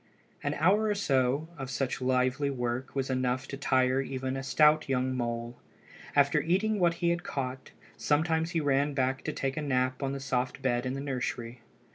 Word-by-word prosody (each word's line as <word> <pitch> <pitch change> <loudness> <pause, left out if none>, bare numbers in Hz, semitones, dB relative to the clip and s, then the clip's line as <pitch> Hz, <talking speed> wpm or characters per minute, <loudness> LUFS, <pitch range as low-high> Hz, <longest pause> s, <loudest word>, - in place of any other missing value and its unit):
An 145 +1 -1
hour 195 +8 +3
or 210 -1 +1
so 140 -5 +1
of 135 -1 -5
such 130 +1 -2
lively 130 +2 +1
work 125 0 -3
was 135 -1 -1
enough 130 +1 0
to - - -4
tire 130 -1 +2
even 130 -1 -3
a 135 - -3
stout 150 +2 +4
young 130 0 0
mole. 120 -1 -3 0.6
After - - +4
eating 200 +5 +1
what 170 -2 +3
he 170 0 0
had 170 0 -1
caught, 130 -4 -4 0.3
sometimes 160 +2 +1
he 165 -1 0
ran 145 0 +1
back 130 0 0
to - - -1
take 135 +1 -3
a - - 0
nap 130 -2 0
on 135 -1 -1
the 140 - -4
soft 130 -1 -2
bed 120 -1 +1
in 130 - -2
the 135 - -4
nursery. 125 -3 -4
135 Hz, 190 wpm, -29 LUFS, 130-150 Hz, 0.6 s, stout